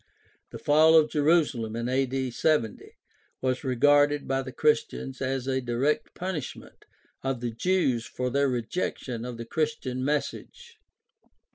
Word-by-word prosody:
The - - -8
fall 155 +2 +5
of 155 -1 +4
Jerusalem 145 -8 +2
in 115 0 -3 0.5
70 120 -5 0
a.d. - - -17 0.5
was 130 +1 -1
regarded 145 +3 +3
by 135 0 0
the 130 -1 -7
Christians 135 -2 0
as 130 -1 -1
a 130 0 0
direct 125 +5 -1
punishment 180 -7 -6 0.4
of 135 -2 -2
the 120 0 -3
Jews 130 -3 0
for 125 0 -3
their 140 +1 +2
rejection 120 -1 -3
of 125 -1 -6
the 115 - -6
Chris 155 +5 -1
tian 130 -1 -4
message. 455 - -4
135 Hz, 140 wpm, -27 LUFS, 125-150 Hz, 0.5 s, fall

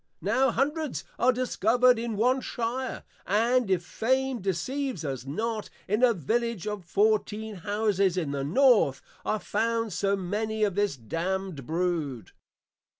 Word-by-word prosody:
Now 255 +7 +3
Hundreds 295 +4 -1 0.2
are 250 +2 +5
discovered 250 0 +3
in 230 -2 -3
one 255 +4 +3
Shire; 245 +2 -3 0.2
and, 230 +3 +2
if 180 -2 +1
Fame 260 +2 0
Deceives 200 - -2
us 135 -2 -4
not, 220 +8 -3 0.2
in 210 +4 +1
a 250 - +7
Village 230 - -1
of 210 -3 -4
Fourteen 215 +2 0
Houses 200 -1 +1
in 160 -6 -1
the 140 -1 -2
North, 190 - +4 0.2
are 215 - 0
found 230 -2 -1
so 200 +3 +1
many 215 +3 -2
of 205 -3 +2
this 205 -6 0
Damned 165 - -3
Brood. 160 -7 -2
210 Hz, 140 wpm, -27 LUFS, 180-240 Hz, 0.2 s, a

